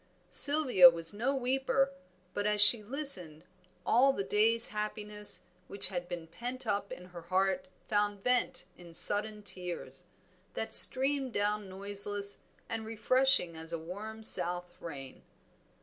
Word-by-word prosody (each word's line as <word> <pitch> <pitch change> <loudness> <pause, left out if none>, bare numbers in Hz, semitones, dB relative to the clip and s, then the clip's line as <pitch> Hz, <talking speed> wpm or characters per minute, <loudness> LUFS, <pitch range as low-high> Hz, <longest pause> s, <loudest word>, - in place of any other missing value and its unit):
Sylvia 280 - +5
was 165 0 -4
no 245 +7 -3
weeper, 270 +1 -1 0.4
but 205 0 -3
as 210 0 -1
she 205 +2 +9
listened, 205 - -2 0.4
all 260 +4 +3
the 200 -7 -5
day's 225 +4 +2
happiness 210 0 -5 0.2
which 200 0 +3
had 175 -2 -7
been 170 -2 -7
pent 245 +10 -9
up 200 0 -4
in 180 - -10
her 175 -1 -12
heart 190 +10 -2 0.2
found 205 -2 -2
vent 250 -7 -1
in 170 -2 -14
sudden 210 +3 +2
tears, 180 -3 -5 0.5
that - - -5
streamed 270 -1 +6
down 205 -1 -3
noiseless 200 +1 -3 0.3
and 225 - -6
refreshing 225 -4 +2
as 160 +1 -9
a 170 - -4
warm 205 +7 -10
south 180 -2 -3
rain. 135 -5 -10
205 Hz, 135 wpm, -29 LUFS, 180-240 Hz, 0.5 s, she